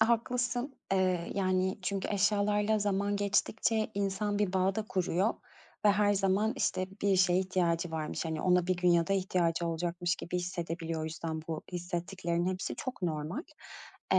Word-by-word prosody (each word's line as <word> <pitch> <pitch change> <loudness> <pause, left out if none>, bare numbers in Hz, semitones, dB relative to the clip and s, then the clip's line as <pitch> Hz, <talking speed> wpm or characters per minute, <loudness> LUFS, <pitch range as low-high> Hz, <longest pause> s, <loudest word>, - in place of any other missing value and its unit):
Haklısın. 245 +3 +1 0.2
Eee, 185 -3 +1
yani, 185 -1 +1
çünkü 195 +1 -2
eşyalarla 210 +1 +2
zaman 205 0 0
geçtikçe 215 +2 +1
insan 200 +1 -1
bir 205 -3 +1
bağ 190 +1 +2
da 220 - -1
kuruyor 185 +3 +1 0.5
ve 205 - +7
her 205 0 +3
zaman, 195 +3 +2
işte, 185 - 0 0.2
bir 200 -1 +3
şeye 180 -1 +4
ihtiyacı 175 -3 0
varmış, 160 +1 -3
hani, 160 -1 -2
ona 180 -1 +3
bir 185 -1 +1
gün 180 0 +2
ya 170 -1 +4
da 195 - 0
ihtiyacı 175 -3 +1
olacakmış 175 +2 -1
gibi 180 - -4
hissedebiliyor. 170 -2 -3
O - - -2
yüzden 160 0 -4
bu 160 -1 -3
hissettiklerinin 175 0 -2
hepsi 185 - -4
çok 255 -7 -5
normal. 160 - -2 0.7
Eee, - - +7
185 Hz, 160 wpm, -31 LUFS, 170-205 Hz, 0.7 s, ve